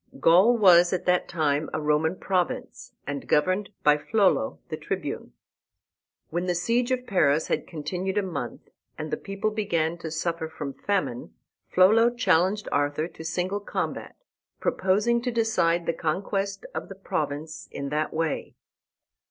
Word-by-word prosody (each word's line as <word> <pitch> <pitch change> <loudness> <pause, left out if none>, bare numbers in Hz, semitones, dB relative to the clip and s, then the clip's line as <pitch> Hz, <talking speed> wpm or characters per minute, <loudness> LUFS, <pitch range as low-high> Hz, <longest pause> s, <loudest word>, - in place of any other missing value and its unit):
Gaul 190 +9 +6
was 180 -4 +6
at 185 - -2
that 180 0 +2
time 155 -2 0
a - - 0
Roman 150 +3 +1
province, 185 -2 -2
and 145 -1 -5
governed 185 +6 +2
by 150 0 +5
Flollo, 190 - +2
the - - -2
Tribune. - - -5 1.0
When 175 +3 -1
the 180 - +1
siege 235 +7 +1
of 255 -1 -1
Paris 155 - +2
had - - -1
continued 180 +5 -3
a 205 - +2
month, 145 -11 -5 0.3
and 155 0 -5
the - - +1
people 195 +2 -3
began 170 -6 -1
to 165 - -5
suffer 165 +1 -2
from 145 -3 -6
famine, 135 - -2 0.3
Flollo 220 +6 +5
challenged 200 -3 +2
Arthur 145 +2 0
to 160 - -11
single 180 +5 -1
combat, 205 - -4 0.4
proposing 210 +5 +1
to 250 - -1
decide 220 -8 +1
the 165 - 0
conquest 195 +5 -2
of - - -5
the 195 - -8
province 155 -4 -4
in 140 0 -5
that 150 +1 -1
way. 160 -1 -2
175 Hz, 150 wpm, -26 LUFS, 155-195 Hz, 1.0 s, Gaul